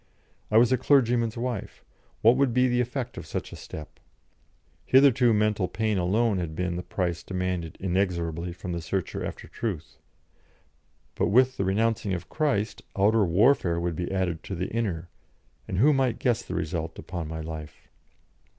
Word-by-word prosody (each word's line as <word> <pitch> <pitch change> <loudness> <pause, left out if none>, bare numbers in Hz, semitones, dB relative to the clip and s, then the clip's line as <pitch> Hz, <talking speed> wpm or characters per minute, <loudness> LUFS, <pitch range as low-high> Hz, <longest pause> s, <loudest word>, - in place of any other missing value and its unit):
I 110 - +4
was 120 +2 +5
a 130 - +3
clergyman's 120 -4 +3
wife; 120 -3 -4 0.4
what 115 +3 +7
would 130 -3 +2
be 125 0 +4
the 125 0 +2
effect 125 +1 -4
of - - -10
such - - -4
a - - -6
step? 75 - -10 0.8
Hitherto 130 -2 +5
mental 105 -3 +2
pain 110 0 -1
alone 100 +3 +2
had 80 -3 -4
been 90 0 -2
the 90 - -3
price 90 -2 -2
demanded 90 -3 -3
inexorably 90 -3 -1
from 90 +1 -7
the 85 -1 -3
searcher 90 +3 -3
after - - -6
truth; 95 -9 -5 1.1
but - - 0
with 130 +4 +4
the 95 - 0
renouncing 105 0 +1
of 90 0 -7
Christ 135 -9 -1 0.2
outer 105 +2 +4
warfare 90 -1 +3
would 85 -1 -2
be 85 +2 -3
added 90 -4 -1
to 95 - -4
the 90 +2 -3
inner, 95 -8 -2 0.6
and 95 - -3
who 145 +9 +5
might 130 -3 +1
guess 120 -2 +1
the - - -6
result 80 0 -3
upon 85 -4 -5
my 80 0 -5
life? 80 -1 -8
95 Hz, 170 wpm, -27 LUFS, 85-120 Hz, 1.1 s, what